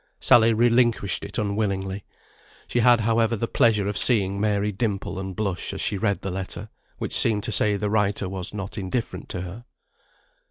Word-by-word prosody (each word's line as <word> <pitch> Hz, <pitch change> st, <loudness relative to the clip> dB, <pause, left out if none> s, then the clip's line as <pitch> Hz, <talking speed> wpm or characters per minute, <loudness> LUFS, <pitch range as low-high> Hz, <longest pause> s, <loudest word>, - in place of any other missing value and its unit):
Sally 115 Hz, -1 st, +5 dB
relinquished 115 Hz, -3 st, +2 dB
it -, -, -5 dB
unwillingly. 100 Hz, -2 st, -2 dB, 0.6 s
She 120 Hz, -, 0 dB
had, 120 Hz, -1 st, +5 dB
however, 115 Hz, +1 st, +2 dB
the 115 Hz, +2 st, -2 dB
pleasure 105 Hz, -4 st, +2 dB
of 100 Hz, 0 st, -1 dB
seeing 100 Hz, -5 st, +1 dB
Mary 105 Hz, -1 st, +1 dB
dimple 100 Hz, -3 st, -3 dB
and 95 Hz, -1 st, -5 dB
blush 95 Hz, -4 st, -3 dB
as -, -, -4 dB
she -, -, 0 dB
read 100 Hz, 0 st, 0 dB
the 95 Hz, -, -4 dB
letter, 95 Hz, +3 st, -5 dB, 0.3 s
which -, -, -4 dB
seemed 105 Hz, -3 st, +3 dB
to -, -, -3 dB
say 105 Hz, -1 st, +2 dB
the 105 Hz, +1 st, -2 dB
writer 100 Hz, -2 st, 0 dB
was 95 Hz, -1 st, -4 dB
not 100 Hz, +1 st, -6 dB
indifferent 95 Hz, -1 st, -4 dB
to 90 Hz, -, -4 dB
her. 95 Hz, +7 st, -8 dB
105 Hz, 175 wpm, -24 LUFS, 95-115 Hz, 0.6 s, Sally